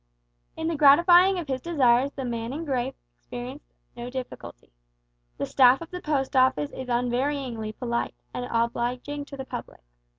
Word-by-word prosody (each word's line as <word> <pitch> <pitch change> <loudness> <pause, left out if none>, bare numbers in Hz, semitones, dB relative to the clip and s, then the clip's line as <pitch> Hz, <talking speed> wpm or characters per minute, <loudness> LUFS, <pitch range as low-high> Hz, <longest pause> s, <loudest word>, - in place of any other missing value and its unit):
In 320 - -2
the 335 - -1
gratifying 345 +6 +6
of 340 -4 -4
his 260 -1 -2
desires 270 -5 +3
the 270 - -5
man 235 0 -3
in 320 +3 -5
grey 255 -4 0 0.3
experienced 250 +4 -9 0.2
no 240 +1 -6
difficulty. 250 - -8 0.7
The - - -2
staff 255 0 +5
of 335 - -10
the 360 0 -6
Post 280 -4 -1
Office 255 - +3
is 260 - -7
unvaryingly 245 -2 -1
polite 235 -2 -2 0.2
and 245 0 -4
obliging 245 +5 -2
to 280 - -10
the 265 - -6
public. - - -8
260 Hz, 160 wpm, -26 LUFS, 240-290 Hz, 0.7 s, gratifying